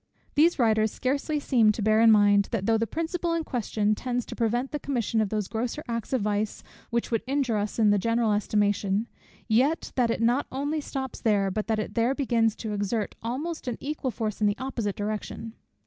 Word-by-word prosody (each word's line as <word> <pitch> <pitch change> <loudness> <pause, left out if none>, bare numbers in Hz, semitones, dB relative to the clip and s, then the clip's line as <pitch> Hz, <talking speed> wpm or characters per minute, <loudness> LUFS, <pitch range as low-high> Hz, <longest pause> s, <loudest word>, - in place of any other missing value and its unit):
These 330 +4 +4
writers 220 -3 +3
scarcely 285 +3 -1
seem 235 -6 +4
to 215 - -5
bear 215 +1 +4
in 230 - +7
mind, 205 -1 +5
that 215 -5 -2
though 225 0 +3
the 230 - 0
principle 335 +3 -2
in 330 - -1
question 215 -5 0
tends 245 +2 -2
to - - -8
prevent 240 +3 0
the 295 - -3
commission 235 -6 0
of 210 - 0
those 210 -2 -2
grosser 240 +6 -3
acts 230 -1 -4
of 260 -4 +1
vice 210 0 -1 0.3
which 235 0 -1
would 230 - +1
injure 265 -5 +1
us 205 0 -3
in 215 -2 +4
the 205 - +3
general 230 +1 +1
estimation; 205 0 +1 0.4
yet 260 +8 +2
that 245 -3 +2
it - - 0
not 245 +5 +2
only 290 +4 -2
stops 265 -2 -5
there, 200 -3 +2
but 210 +2 -3
that 220 -1 +1
it 215 - -3
there 240 +3 +1
begins 230 -6 +1
to 220 -2 -5
exert 205 +1 -1
almost 280 +8 -4
an 245 - -2
equal 290 -1 -3
force 220 -3 -4
in 210 - +4
the 205 - 0
opposite 235 -6 -3
direction. 215 +2 -4
230 Hz, 210 wpm, -27 LUFS, 215-260 Hz, 0.4 s, in